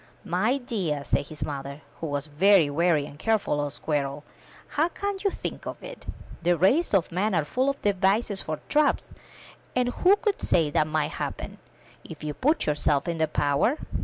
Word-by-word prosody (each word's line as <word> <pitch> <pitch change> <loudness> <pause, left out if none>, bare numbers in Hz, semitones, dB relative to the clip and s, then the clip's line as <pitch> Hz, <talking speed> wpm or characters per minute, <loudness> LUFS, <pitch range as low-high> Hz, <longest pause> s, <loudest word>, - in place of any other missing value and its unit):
My 210 +8 +1
dear," 195 - -2
said 140 - 0
his 155 - -6
mother, 140 0 -6 0.2
who 165 - -3
was 145 0 -2
a - - -7
very 175 -1 +5
wary 160 -1 +2
and 145 0 -12
careful 215 -9 +1
old 145 -1 -3
squirrel, 145 -2 -2 0.5
*'how 310 +3 +2
can 400 +2 -3
you 400 - +3
think - - -6
of - - -7
it? - - -10 0.3
The 175 0 +2
race 265 - +3
of 185 - +1
man 190 +3 0
are 155 -3 +1
full 255 - +1
of 275 - -3
devices 200 +1 +1
for 155 -1 -4
traps, 300 0 +2 0.6
and 250 -1 +2
who 365 +10 +4
could 415 -1 -1
say 160 -4 +2
what 155 +1 +2
might 155 0 0
happen, - - -5 0.4
if - - -10
you 150 -1 -3
put 300 - +1
yourself 145 -1 +1
in 170 -1 -2
their 160 - +2
power? 145 - +1
175 Hz, 190 wpm, -26 LUFS, 150-240 Hz, 0.6 s, very